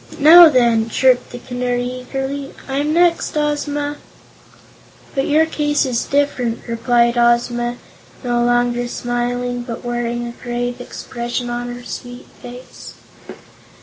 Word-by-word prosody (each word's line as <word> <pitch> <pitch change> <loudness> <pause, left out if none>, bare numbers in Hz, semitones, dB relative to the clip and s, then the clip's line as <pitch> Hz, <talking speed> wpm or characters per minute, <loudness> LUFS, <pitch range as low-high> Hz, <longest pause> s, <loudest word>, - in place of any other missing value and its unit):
"Now, 325 +3 +9
then," 235 -4 +2
chirped 255 +2 +2
the 245 - -8
Canary, 245 0 -3
eagerly; 270 +2 -5
"I'm 285 +3 -1
next, 340 -1 +2
Ozma!" 290 -1 -2 1.2
"But 270 0 -1
your 310 +2 +4
case 295 -2 0
is 250 -3 -1
different," 265 -5 -1
replied 235 +1 +1
Ozma, 240 0 +1 0.5
no 240 -1 0
longer 240 0 +1
smiling 245 0 -3
but 240 0 -7
wearing 240 0 -2
a 235 - -5
grave 245 0 -4
expression 240 0 -5
on 240 0 -3
her 245 - -11
sweet 245 0 -8 0.2
face. 245 +1 -11
245 Hz, 120 wpm, -18 LUFS, 240-275 Hz, 1.2 s, Now